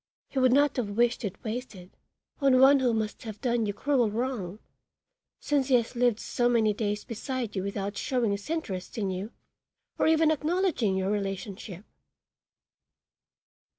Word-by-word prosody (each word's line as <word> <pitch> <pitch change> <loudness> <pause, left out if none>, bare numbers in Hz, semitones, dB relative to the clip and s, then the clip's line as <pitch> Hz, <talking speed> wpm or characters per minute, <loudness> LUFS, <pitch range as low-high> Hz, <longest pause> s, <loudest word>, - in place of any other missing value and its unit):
He 270 - -2
would 255 -1 +4
not 285 +2 +3
have 235 -5 -1
wished 240 0 +2
it 200 -4 -3
wasted 220 -6 -6 0.5
on 270 -3 +4
one 275 +1 +7
who 255 -2 +2
must 220 -2 -2
have 220 -3 -8
done 240 -4 0
you 205 - -2
cruel 255 0 +1
wrong, 215 -4 -3 0.8
since 285 -3 0
he 265 - +4
has 235 +1 0
lived 240 -2 +2
so 240 0 0
many 220 -3 +3
days 205 0 -2
beside 235 -1 -4
you 190 - -1
without 200 +1 -4
showing 245 -5 0
his 200 +4 -4
interest 210 - -4
in 200 -3 -1
you 190 +5 -5 0.7
or - - +3
even 320 0 +4
acknowledging 310 - 0
your 190 +1 0
relationship." 195 -1 -4
230 Hz, 155 wpm, -28 LUFS, 205-260 Hz, 0.8 s, one